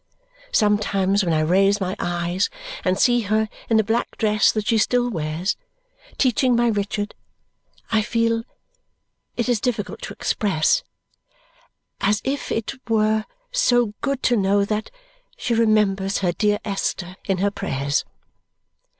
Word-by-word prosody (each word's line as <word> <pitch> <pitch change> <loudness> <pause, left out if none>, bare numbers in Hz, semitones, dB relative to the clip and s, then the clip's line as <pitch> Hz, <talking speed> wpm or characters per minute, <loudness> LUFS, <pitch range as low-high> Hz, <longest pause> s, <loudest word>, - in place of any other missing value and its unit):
Sometimes 205 -2 +2
when 170 - 0
I 155 -1 +2
raise 195 +5 +3
my 190 -1 -2
eyes 175 +2 -1 0.3
and 185 0 +1
see 240 +2 +4
her 215 +1 +2 0.2
in 225 - +4
the 220 - +4
black 225 +3 -1
dress 215 -2 +3
that 215 -1 -2
she 225 0 +2
still 245 +2 +2
wears, 165 +2 -2 0.6
teaching 255 -1 +3
my 240 0 +3
Richard, 205 0 -2 0.8
I 220 -1 +3
feel 230 +1 +1 1.0
it 235 - 0
is 240 -4 +1
difficult 225 -5 -2
to - - -6
express 190 -7 +1 1.2
as 205 +1 +2
if 275 +2 -3
it 225 +3 -2 0.2
were 215 -1 +2 0.3
so 245 - +2
good 275 -2 -2
to 245 - +3
know 200 -1 +2
that 215 +1 -2 0.5
she 240 - -1
remembers 210 -4 +2
her 180 -3 +1
dear 205 +4 +1
Esther 190 -3 -3
in 195 -2 0
her 200 +2 +1
prayers. 140 -8 -1
210 Hz, 140 wpm, -22 LUFS, 195-230 Hz, 1.2 s, see